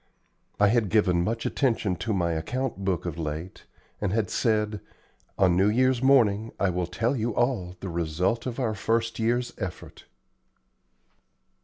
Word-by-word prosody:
I 105 0 +5
had 115 -2 +2
given 90 -5 +3
much 115 +4 -2
attention 115 -8 0
to 110 - -3
my 90 -4 +1
account 100 +7 -3
book 95 -4 -1
of 85 -1 -4
late, 80 +3 -5 0.3
and 100 -3 0
had 110 -2 0
said, 105 -2 0 0.6
"On 90 -2 +4
New 95 +3 +4
Year's 130 +2 +2
morning 115 -5 +3
I 100 -2 +2
will 90 0 -2
tell 115 +9 -1
you 115 -2 -2
all 115 -8 0
the 95 - -4
result 85 +8 -1
of 125 +1 -4
our 115 -4 0
first 115 +2 -1
year's 120 +2 0
effort." 90 -4 -7
105 Hz, 155 wpm, -26 LUFS, 90-115 Hz, 0.6 s, I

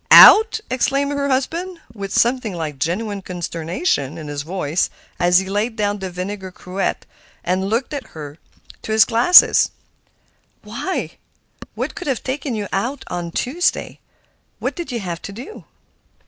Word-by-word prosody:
"Out!" 445 +1 +9
exclaimed 275 +3 +1
her 280 0 -1
husband, 335 +7 -2
with 200 -3 -6
something 240 -5 +1
like 155 -5 -5
genuine 200 +7 -2
consternation 170 - -2
in 155 -2 -7
his 145 -1 -3
voice 165 0 -1 0.3
as 175 0 +4
he 190 - +2
laid 210 +4 -1
down 205 -1 -1
the 190 -1 -4
vinegar 190 +2 -5
cruet 180 +2 -3 0.4
and 185 +2 0
looked 240 +7 -1
at 280 -2 -5
her 150 0 -8 0.4
through 220 - -3
his 220 0 +6
glasses. 240 +10 +6 0.9
"Why, - - -4 0.6
what - - -3
could - - -7
have 265 -4 -1
taken 270 -1 -3
you 205 -2 -3
out 240 +9 -2
on 175 -1 -4
Tuesday? 280 - -1 0.6
What - - -3
did 345 -6 -5
you 235 -2 -3
have 175 -3 -5
to - - -7
do?" 250 - -10
205 Hz, 150 wpm, -20 LUFS, 175-260 Hz, 0.9 s, Out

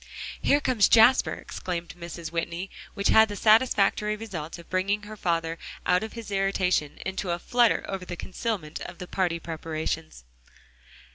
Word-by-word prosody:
"Here 285 - +4
comes 250 -8 +3
Jasper," 245 +3 +6
exclaimed 175 -2 -5
Mrs. 170 -2 -7
Whitney, 170 +2 -3 0.2
which 200 - +1
had 220 0 +6
the 205 - -4
satisfactory 215 -1 +3
result 185 -9 -6
of 170 - -13
bringing 200 +3 0
her 215 +1 -8
father 165 -4 -1 0.3
out 180 0 +3
of 220 0 -6
his 230 -3 -8
irritation, 190 -6 +1
into 190 0 -3
a 170 - 0
flutter 240 +5 +2
over 195 -2 -4
the 175 - -5
concealment 185 -5 -4
of - - -7
the 180 - -6
party 175 -2 -1
preparations. 160 - -4
185 Hz, 155 wpm, -27 LUFS, 170-210 Hz, 0.3 s, Jasper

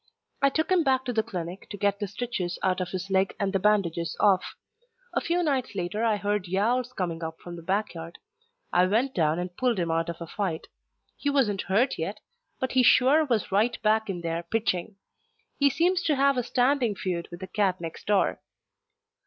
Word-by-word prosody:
I 275 - +5
took 315 +5 -1
him 370 -2 +5
back 265 -1 +2
to 250 - -2
the 220 - +2
clinic 185 -4 -6
to 205 - -6
get 200 0 +1
the 205 - -2
stitches 200 -4 -3
out 185 -1 +1
of 180 - -3
his 185 +1 -5
leg 190 0 +2
and 200 -1 0
the 195 - +2
bandages 180 -5 +1
off. 195 -3 +3 0.6
A - - +1
few 350 +1 0
nights 265 -8 -1
later 185 +4 -2
I 220 -2 +2
heard 205 -2 -1
yowls 235 +7 +1
coming 170 -5 -3
up 160 0 -5
from 175 -1 -9
the 170 - -9
backyard. 170 -2 -3 0.6
I 180 +1 +5
went 240 +7 +1
down 160 -2 +2
and 180 0 -4
pulled 245 -1 +1
him 170 -2 0
out 165 +1 0
of 170 - -5
a 170 - -5
fight. 175 -2 -3 0.5
He 285 - -1
wasn't 235 -9 +2
hurt 225 +5 +2
yet, 195 +6 -3 0.4
but 260 - -1
he 260 - +4
sure 270 +5 +5
was 230 -9 -1
right 220 +5 +2
back 220 0 +2
in 180 -3 -3
there 165 0 -2
pitching. 195 +1 -1 0.6
He 280 0 +5
seems 345 +6 +2
to 305 - +3
have 275 0 +3
a 250 - +1
standing 245 -2 +1
feud 175 -3 -3
with 175 +1 -10
the - - -4
cat 190 -2 0
next 165 -1 -8
door. 205 -2 +2
205 Hz, 205 wpm, -27 LUFS, 180-250 Hz, 0.6 s, I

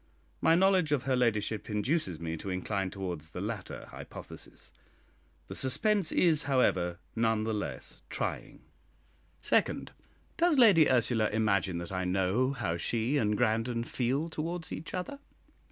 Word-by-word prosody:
My 165 - +5
knowledge 185 -3 +3
of 140 -3 +1
her 135 -1 +1
ladyship 110 -3 0
induces 105 - 0
me 80 -1 -3
to 95 - -6
incline 95 +1 -2
towards 90 -5 -5
the 90 - -7
latter 100 0 -5
hypothesis; - - -9 0.7
the - - -7
suspense 200 - +2
is, 160 -4 +3
however, 90 -10 +2 0.2
none 110 -1 +1
the 110 0 -1
less 105 - -5
trying. - - -4 0.8
Second, - - +1 0.5
Does 335 -3 +3
Lady 200 - +7
Ursula 120 -3 +2
imagine 100 -5 +1
that 85 +1 -6
I 95 -1 -2
know 95 +8 +1
how 105 -10 -2
she 115 - 0
and 105 -5 +1
Grandon 115 0 +1
feel 135 +6 -1
towards 165 +1 -4
each 160 - -6
other? 185 +10 -5
115 Hz, 140 wpm, -30 LUFS, 95-150 Hz, 0.8 s, Lady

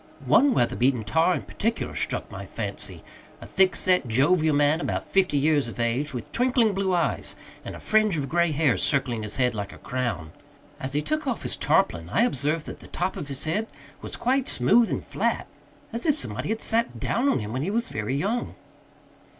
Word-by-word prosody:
One 275 -2 +4
weather 120 - +2
beaten 125 -2 +2
tar 165 +9 +2
in - - -4
particular 230 +2 -3
struck - - -2
my - - -7
fancy - - -5 0.4
a - - -10
thick 190 -1 +2
set, 180 -8 +2
jovial 155 +6 +3
man, 145 +3 +3
about - - -2
fifty 185 -6 +2
years 145 -2 +2
of 115 - -8
age, 120 +6 0
with 125 -4 -7
twinkling 245 -3 +2
blue 190 -1 0
eyes 170 - -1 0.3
and - - -7
a - - -9
fringe 215 -5 +2
of 140 -2 -2
gray 170 +1 +2
hair 150 -4 +2
circling 130 -5 +1
his 105 -1 -4
head 125 -2 +1
like 105 -2 -4
a - - -12
crown. 115 -11 -3 0.5
As 130 +1 -5
he 150 +1 0
took 310 -1 -2
off 245 -5 -2
his - - -2
tarpaulin 80 +1 +1
I 230 - +2
observed 150 - +1
that - - -8
the - - -13
top 180 +2 -2
of 145 - -6
his 140 -1 -7
head 210 +8 -1 0.3
was - - -5
quite 260 +2 0
smooth 220 - +4
and - - -3
flat, - - -1 0.5
as 235 +7 0
if 300 -1 +3
somebody 125 - -4
had 220 0 -1
sat 230 +1 +1
down 260 +4 +1
on - - +2
him 105 -1 -4
when 130 - -2
he 165 - -1
was 235 +4 0
very 105 +5 -2
young. 210 +11 -2
155 Hz, 205 wpm, -25 LUFS, 130-215 Hz, 0.5 s, One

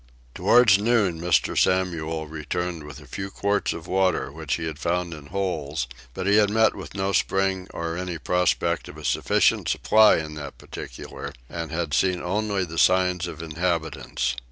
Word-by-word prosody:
Towards 115 -5 +5
noon 105 -7 +2
Mr. 85 -1 +2
Samuel 80 -4 +1
returned 80 +2 -4
with 75 -1 -9
a 75 - -14
few 95 +9 -5
quarts 100 +1 0
of 85 - -6
water 95 -7 +1
which 80 0 -2
he 80 - -4
had 80 -2 -5
found 85 0 -1
in 75 -2 -10
holes; 80 -7 -2 0.3
but 95 - -3
he 100 +1 +4
had 105 -1 +5
met 110 +1 +3
with - - -9
no 95 0 0
spring 95 -1 +1
or 85 0 -4
any 90 -1 -4
prospect 90 +5 0
of - - -10
a - - -9
sufficient - - +2
supply 110 0 +5
in 80 -1 -4
that 70 -2 -8
particular, - - -8 0.2
and 80 +1 -5
had 80 -3 -2
seen 90 +3 +2
only 100 +1 -1
the 85 -1 -4
signs 90 -1 +3
of 80 -1 -7
inhabitants. 80 -5 -2
90 Hz, 175 wpm, -25 LUFS, 80-95 Hz, 0.3 s, Towards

